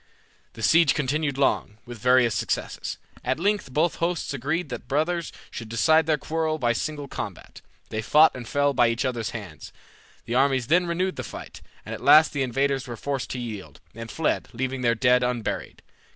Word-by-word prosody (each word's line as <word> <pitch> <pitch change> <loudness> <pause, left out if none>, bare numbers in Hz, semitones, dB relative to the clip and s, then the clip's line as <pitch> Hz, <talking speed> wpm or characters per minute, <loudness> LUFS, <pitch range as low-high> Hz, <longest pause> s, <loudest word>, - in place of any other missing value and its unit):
The 115 - -9
siege 165 +8 +5
continued 145 0 -1
long, 135 -6 +1
with 120 -2 -9
various 125 -1 +4
success. - - -3 0.3
At 130 +3 -1
length 205 -5 0
both 160 +6 +1
hosts 170 -3 -1
agreed 145 +5 -2
that 125 - -4
the - - -25
brothers 160 +5 -1 0.2
should 115 -1 -7
decide 155 +8 +3
their 155 -2 +3
quarrel 160 0 -1
by 120 -5 +1
single 145 +4 -4
combat. - - -7 0.3
They 110 - -3
fought 150 +8 +5
and 125 -2 -7
fell 145 +1 +1
by 120 -2 +4
each 115 +3 -1
other's 120 -4 -2
hands. - - -8 0.5
The 115 - -4
armies 130 -1 +2
then 175 +6 +3
renewed 180 +2 -1
the - - -3
fight, - - -9 0.2
and - - -6
at - - -7
last 155 +1 +6
the 140 - -1
invaders 135 +1 0
were 120 -1 -6
forced 140 +2 -3
to 125 - -4
yield, 110 -6 -7
and 115 0 -8
fled, 160 +5 -1
leaving 130 +2 -3
their 120 -1 +2
dead 125 +1 +3
unburied. 125 -3 -3
135 Hz, 190 wpm, -25 LUFS, 120-155 Hz, 0.5 s, last